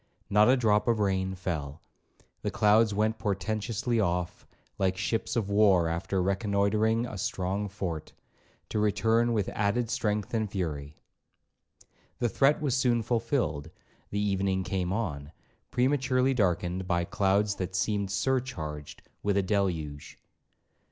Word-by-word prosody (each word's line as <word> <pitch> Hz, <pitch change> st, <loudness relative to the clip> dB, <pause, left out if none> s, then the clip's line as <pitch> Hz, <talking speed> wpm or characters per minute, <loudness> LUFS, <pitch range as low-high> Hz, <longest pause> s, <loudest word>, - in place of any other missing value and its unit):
Not 105 Hz, +3 st, +5 dB
a 130 Hz, -, +5 dB
drop 105 Hz, -3 st, +2 dB
of 115 Hz, -1 st, +3 dB
rain 95 Hz, -2 st, 0 dB
fell; 80 Hz, -5 st, -4 dB, 0.6 s
the -, -, -1 dB
clouds 105 Hz, +1 st, +4 dB
went 110 Hz, +2 st, 0 dB
portentously 110 Hz, +4 st, -1 dB
off, 90 Hz, -2 st, -1 dB, 0.3 s
like 95 Hz, -1 st, +1 dB
ships 110 Hz, +4 st, -1 dB
of 115 Hz, -5 st, 0 dB
war 100 Hz, -4 st, +4 dB
after 90 Hz, +3 st, -1 dB
reconnoitering 100 Hz, +3 st, +1 dB
a 110 Hz, -5 st, -6 dB
strong 95 Hz, +3 st, -2 dB
fort, 90 Hz, -6 st, -5 dB, 0.6 s
to 110 Hz, -, -1 dB
return 115 Hz, +3 st, +2 dB
with 105 Hz, -4 st, 0 dB
added 110 Hz, +3 st, 0 dB
strength 105 Hz, -1 st, -1 dB
and 110 Hz, -2 st, 0 dB
fury. 75 Hz, -7 st, -4 dB, 1.2 s
The 120 Hz, -, 0 dB
threat 135 Hz, +8 st, +3 dB
was 140 Hz, -5 st, 0 dB
soon 120 Hz, -3 st, +2 dB
fulfilled; 115 Hz, -, -1 dB, 0.4 s
the 100 Hz, -, -2 dB
evening 95 Hz, -2 st, 0 dB
came 90 Hz, -1 st, -2 dB
on, 80 Hz, -8 st, -3 dB, 0.4 s
prematurely 130 Hz, 0 st, +2 dB
darkened 90 Hz, -4 st, 0 dB
by 85 Hz, -2 st, +1 dB
clouds 100 Hz, +3 st, +1 dB
that 95 Hz, 0 st, -4 dB
seemed 100 Hz, +1 st, 0 dB
surcharged 95 Hz, -, -3 dB, 0.2 s
with 100 Hz, -1 st, +1 dB
a 100 Hz, -, +2 dB
deluge. 85 Hz, -8 st, -2 dB
100 Hz, 130 wpm, -28 LUFS, 90-110 Hz, 1.2 s, Not